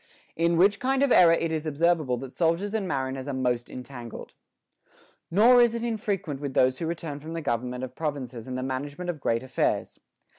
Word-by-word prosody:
In 170 +1 +2
which 200 +3 +4
kind 265 +2 +1
of 280 - +2
error 170 -2 +7
it 165 -1 0
is 160 0 -2
observable 155 -4 +1
that 130 +1 -8
soldiers 175 +5 0
and 210 -4 -1
mariners 130 -3 -3
are 140 - -3
most 125 -2 -1
entangled. 125 -2 -9 1.0
Nor 235 +7 +6
is 235 -1 +3
it 235 - -3
infrequent 200 - -2
with 140 -2 -4
those 130 0 +3
who 165 - -2
return 160 -3 -4
from 160 +3 -8
the 165 - -3
government 125 -2 -2
of 130 -1 -6
provinces 130 -7 -4
and 130 0 -4
the 130 - -3
management 145 +7 -3
of 160 - -11
great 115 -1 0
affairs. 130 -1 -1
150 Hz, 195 wpm, -26 LUFS, 130-175 Hz, 1.0 s, error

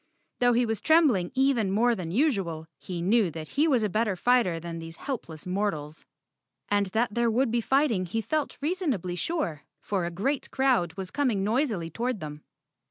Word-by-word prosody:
Though 245 0 +4
he 240 +1 +3
was 225 -2 -2
trembling 290 - +4
even 260 -6 +2
more 235 +5 +3
than 180 -7 -4
usual, 190 - 0
he 175 -2 -5
knew 210 0 +3
that 155 -1 -7
he 300 +4 +2
was 255 -7 +3
a - - +2
better 215 0 0
fighter 215 -5 +2
than 165 0 -6
these 165 0 -9
helpless 170 - -6
mortals. 180 -6 -3 0.6
And 205 -1 +2
that 220 +3 0
there 235 +1 +2
would 235 +2 +1
be 235 0 +1
fighting 235 -8 +2
he 225 +7 -2
felt 305 +6 -2
reasonably 285 - -1
sure, 180 - -2 0.2
for 190 -4 -2
a - - -2
great 245 +11 -2
crowd 255 -11 +2
was 190 -2 -6
coming 245 -9 0
noisily 215 - 0
toward 240 +3 -2
them. 150 -2 -7
215 Hz, 180 wpm, -27 LUFS, 175-255 Hz, 0.6 s, Though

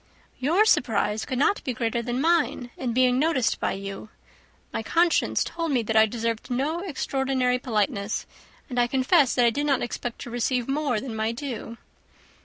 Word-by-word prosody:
"Your 335 +11 +3
surprise 220 - +1
could 260 - -3
not 295 +9 +2
be 255 - -2
greater 235 0 -1
than 240 +1 -3
mine 300 -6 +1
in 250 -2 -3
being 250 +1 +3
noticed 295 -5 +1
by - - 0
you. 195 +2 -7 0.6
My - - -1
conscience 335 +9 +2
told 335 -2 -3
me 250 -4 +1
that 225 +1 -2
I 220 0 +6
deserved 230 0 -3
no 280 +7 -1
extraordinary 265 -7 -1
politeness, 215 -3 -1 0.4
and 245 -3 -2
I 240 - +3
confess 265 +2 +3
that 245 - +4
I 235 - +4
did 290 +5 -2
not 275 -3 +2
expect 240 0 -5
to 240 - -7
receive 245 0 0
more 275 -4 0
than 235 -1 -6
my 220 +1 0
due." 235 -2 -6
250 Hz, 180 wpm, -25 LUFS, 230-280 Hz, 0.6 s, I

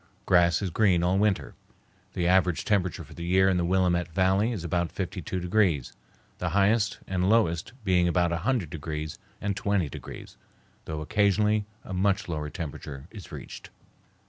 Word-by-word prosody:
Grass 85 0 +4
is 95 - -2
green 90 -3 +3
all 90 +2 +2
winter. 105 -2 +1 0.6
The 90 - -1
average 90 -2 +3
temperature 95 -4 0
for - - -14
the 85 - -7
year 95 +2 +3
in 95 -2 +3
the 90 - +1
Willamette 90 -1 +2
Valley 95 +5 +2
is 100 -8 -4
about 85 0 -1
52 95 -1 -4
degrees, 90 - +1 0.5
the - - -1
highest 105 +1 +3
and 95 0 0
lowest 95 -5 +2
being 90 -3 +3
about 85 0 +2
100 90 - -1
degrees 75 -1 -5 0.2
and 100 -2 -2
20 100 -6 0
degrees, - - -10 0.5
though 80 -1 -4
occasionally 105 +3 +2 0.2
a 95 - -7
much 100 +1 +1
lower 75 -3 -3
temperature 70 -2 -7
is 100 -7 -11
reached. - - -9
90 Hz, 160 wpm, -27 LUFS, 85-100 Hz, 0.6 s, Grass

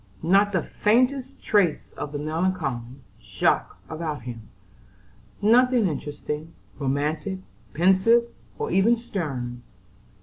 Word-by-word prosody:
Not 195 +4 +4
the 185 -4 0
faintest 255 +5 +1
trace 195 -7 +2
of 145 - -6
the 145 - -3
melancholy 150 -6 -2 0.2
Jaques - - 0
about 155 -5 -4
him; 115 -3 -8 0.9
nothing 245 0 +5
interesting, 150 +1 -5 0.2
romantic, 150 +6 -1 0.4
pensive, 190 +8 +5 0.3
or 445 - -3
even 220 +5 +4
stern. 135 - -4
165 Hz, 100 wpm, -25 LUFS, 145-210 Hz, 0.9 s, nothing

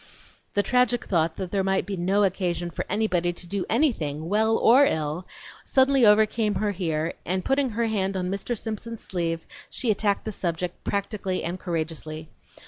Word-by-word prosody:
The 205 - +3
tragic 250 0 +2
thought 165 -3 +1
that 185 -2 -5
there 195 -1 +1
might 195 0 +1
be 200 - -3
no 190 +3 +2
occasion 175 -3 -1
for - - -4
anybody 185 -4 +1
to 175 +1 -6
do 195 +1 -2
anything, 165 - 0
well 220 +2 +3
or 255 +5 +6
ill, 160 - -1 0.4
suddenly 265 -3 +4
overcame 215 0 +3
her 210 +1 0
here, 165 -4 -1
and 185 +1 -1
putting 270 0 +2
her 230 +1 -1
hand 195 -3 -1
on 180 0 -2
Mr. 200 +4 -2
Simpson's 225 +1 -5
sleeve, 165 -3 -2 0.2
she 240 - 0
attacked 205 -1 0
the 220 - -2
subject 175 -2 -3
practically 200 -2 -2
and 175 +2 -3
courageously. 160 -2 -4
195 Hz, 170 wpm, -25 LUFS, 175-220 Hz, 0.4 s, or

